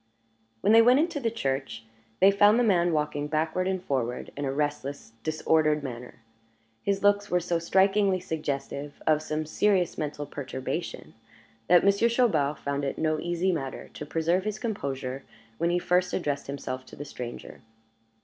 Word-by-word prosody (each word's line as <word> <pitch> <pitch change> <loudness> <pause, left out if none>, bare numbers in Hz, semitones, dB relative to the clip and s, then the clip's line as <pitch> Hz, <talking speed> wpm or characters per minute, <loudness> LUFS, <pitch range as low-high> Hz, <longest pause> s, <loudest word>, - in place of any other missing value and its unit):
When 210 - +4
they 225 - +9
went 245 +3 +6
into 325 -1 0
the 235 -4 0
church, 135 - -3 0.4
they 195 +1 +8
found 205 +2 +5
the 245 - +3
man 175 -6 +3
walking 150 -1 -1
backward 160 +4 0
and 190 -1 -2
forward 125 -6 -2
in 145 - -3
a 135 - -1
restless, 145 -4 -3
disordered 155 0 +1
manner. 120 -3 -8 0.6
His 200 0 -1
looks 205 0 +3
were 180 - +2
so 170 -1 -1
strikingly 195 +2 +3
suggestive 145 -4 -4
of 155 -1 +3
some 155 0 -3
serious 185 +2 +1
mental 150 -1 -3
perturbation, 135 +3 -5 0.5
that 175 -1 +6
Monsieur 200 +4 +4
Chaubard 165 - +2
found 140 0 -3
it 135 - -2
no 155 -1 0
easy 175 +3 0
matter 135 -6 -4
to - - -7
preserve 165 +4 0
his 215 0 -3
composure 135 - -4 0.4
when 170 - +2
he 175 - +2
first 180 +1 +1
addressed 145 -5 -2
himself 130 -2 -5
to - - -12
the 145 - -7
stranger. 120 -4 -8
160 Hz, 165 wpm, -27 LUFS, 140-190 Hz, 0.6 s, they